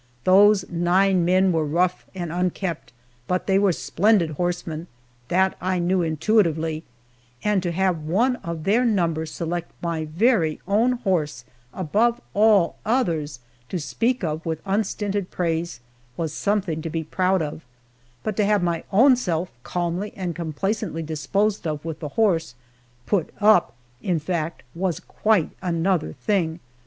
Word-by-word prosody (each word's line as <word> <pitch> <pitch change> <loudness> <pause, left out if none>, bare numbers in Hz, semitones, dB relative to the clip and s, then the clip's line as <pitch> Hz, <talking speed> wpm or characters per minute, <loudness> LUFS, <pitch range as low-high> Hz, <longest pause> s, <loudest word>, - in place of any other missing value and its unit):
Those 195 +2 +5
nine 180 +2 +2
men 185 +1 +4
were 160 -2 +1
rough 175 +4 0
and 175 -3 -4
unkempt, 180 -1 -2 0.4
but 180 0 0
they 195 0 +3
were 200 -2 +4
splendid 180 0 +2
horsemen 175 0 -3 0.4
that 190 +5 +2
I 185 +1 0
knew 180 +1 +1
intuitively 160 -2 +1 0.6
and 210 -2 +2
to 175 -1 -2
have 180 -2 0
one 225 +12 +1
of 170 -6 -6
their 215 +8 +3
number 170 -8 +1
select 170 +2 -4
my 165 -2 -2
very 165 -1 +2
own 225 +6 +3
horse 160 - -1 0.3
above 215 - +1
all 205 -4 +4
others 165 - 0 0.3
to 185 - -2
speak 235 - -1
of 155 -1 -2
with 160 -1 -3
unstinted 200 -1 -1
praise, 170 -5 -2 0.4
was 160 -3 -2
something 190 -4 -1
to 165 - -4
be 165 0 -2
proud 185 +2 +1
of, 150 +1 -6 0.6
but 215 -2 -2
to 210 - +3
have 205 -2 +2
my 170 -2 -1
own 250 +7 +6
self 180 -7 -2
calmly 175 +7 -3
and 180 -4 -4
complacently 170 +2 -2
disposed 195 +6 -1
of 150 0 -4
with 160 -2 -5
the 150 - -5
horse 170 - +2 0.5
"put 195 -6 0
up," 190 - +4 0.3
in 180 -4 0
fact 165 0 -3
was 175 -1 -1
quite 215 -7 +1
another 175 -1 0
thing. 175 -6 -1
175 Hz, 145 wpm, -23 LUFS, 160-200 Hz, 0.6 s, own